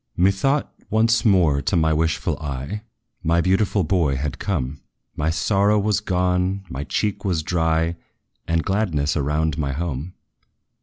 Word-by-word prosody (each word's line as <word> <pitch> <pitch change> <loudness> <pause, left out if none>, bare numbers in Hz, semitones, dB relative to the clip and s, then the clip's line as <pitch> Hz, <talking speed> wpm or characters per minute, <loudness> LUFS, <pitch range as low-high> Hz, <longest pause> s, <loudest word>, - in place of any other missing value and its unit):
Methought, 100 +11 +2 0.2
once 115 +2 +3
more 85 -10 +4
to 70 - 0
my 80 -1 +3
wishful 80 -1 0
eye 70 +7 -4 0.4
My 85 0 +2
beautiful 95 +2 +2
boy 80 -4 +1
had 70 +1 -3
come: 75 -7 -2 0.3
My 75 +2 0
sorrow 100 +5 +2
was 105 0 +1
gone, 90 0 0
my 65 +3 -4
cheek 105 +6 -2
was 85 -5 0
dry, 80 0 0 0.5
And 85 -1 +1
gladness 85 -8 0
around 75 +1 0
my 70 -2 -1
home. 80 +2 -4
85 Hz, 140 wpm, -22 LUFS, 75-100 Hz, 0.5 s, more